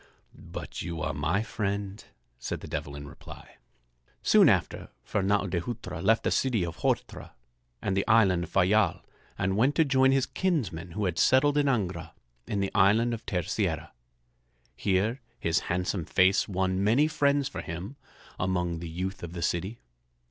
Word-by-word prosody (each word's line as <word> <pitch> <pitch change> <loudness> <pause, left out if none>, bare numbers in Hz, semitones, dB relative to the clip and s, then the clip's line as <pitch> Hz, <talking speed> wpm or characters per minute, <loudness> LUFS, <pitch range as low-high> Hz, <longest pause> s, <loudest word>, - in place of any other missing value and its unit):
"But - - -8
you 85 -1 -5
are - - -1
my 80 +9 0
friend," 100 -1 -3 0.4
said - - -4
the - - -8
Devil 70 - -4
in 70 0 -8
reply. - - -13 0.7
Soon - - +6
after, - - 0 0.2
Fernâo 100 0 +1
de 90 -2 -1
Hutra 105 -5 -6
left 110 +5 +3
the - - 0
city 120 -9 +1
of 85 -1 -7
Horta - - -2 0.5
and 95 - 0
the 100 - 0
island 95 -6 +4
of - - -16
Fayal 100 +1 +2 0.3
and 95 +1 0
went 125 +7 +2
to 160 - +4
join 135 -1 +4
his 135 -1 +2
kinsmen 110 - -2
who 105 +3 -1
had 85 -2 -1
settled 135 +8 +4
in 145 -1 +2
Angra 95 -10 -1 0.3
in 100 - -1
the 100 - -2
island 110 +5 +4
of 115 - -6
Terceira. 90 -4 -2 0.8
Here 105 +7 0 0.2
his 85 - +1
handsome 90 0 -1
face 95 +3 +3
won 95 0 0
many 120 +9 +4
friends 145 -3 +1
for 140 - -6
him 90 - -6 0.4
among 90 -2 -1
the 85 0 -6
youth 95 +4 -4
of 85 -1 -7
the 85 -1 -4
city. 95 +7 -1
95 Hz, 165 wpm, -28 LUFS, 90-115 Hz, 0.8 s, Soon